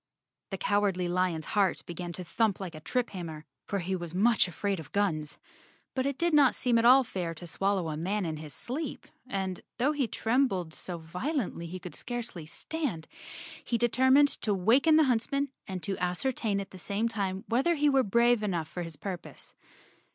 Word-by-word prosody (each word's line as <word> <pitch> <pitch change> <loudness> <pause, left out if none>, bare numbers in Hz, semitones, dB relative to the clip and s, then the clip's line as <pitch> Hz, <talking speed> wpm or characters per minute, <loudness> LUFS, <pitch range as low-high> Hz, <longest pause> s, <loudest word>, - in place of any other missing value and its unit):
The 195 - -3
Cowardly 195 -3 +1
Lion's 175 -3 0
heart 200 -3 +2
began 175 0 -5
to 180 - -6
thump 210 +3 +1
like 185 -3 -5
a 155 - -8
triphammer, 175 -7 -3 0.2
for 200 - -1
he 190 0 -1
was 175 -1 -6
much 215 +1 +4
afraid 195 +2 -2
of 155 - -10
guns. 155 -7 0 0.6
But 260 0 0
it 280 -1 -2
did 340 +2 +1
not 285 -4 +6
seem 240 -2 +2
at 230 - +2
all 260 +2 +8
fair 180 -7 -4
to 175 - -8
swallow 195 +1 0
a 155 - -3
man 190 +4 -1
in 160 -2 -3
his 150 -1 -8
sleep 270 - -5 0.2
afidj. 190 -5 -2 0.2
though 260 +5 +2
he 285 -5 0
trembled 220 -9 0
so 175 +1 -4
violently 180 - -3
he 180 +3 -6
could 180 -1 -9
scarcely 235 -10 -5
stand, 230 - -3 0.6
he 235 - 0
determined 260 +4 +5
to 210 -3 +1
waken 250 - +4
the 315 - +6
huntsman 275 +2 +1 0.2
and 185 -4 -5
to 195 +3 -2
ascertain 200 +3 0
at 195 - -6
the 185 - -10
same 205 +5 -1
time 195 -4 -2
whether 270 +9 +2
he 295 -1 +2
were 270 -2 +5
brave 235 +1 +3
enough 175 -7 -1
for 175 - -6
his 165 -2 -6
purpose. 175 +3 -7
200 Hz, 190 wpm, -29 LUFS, 175-245 Hz, 0.6 s, all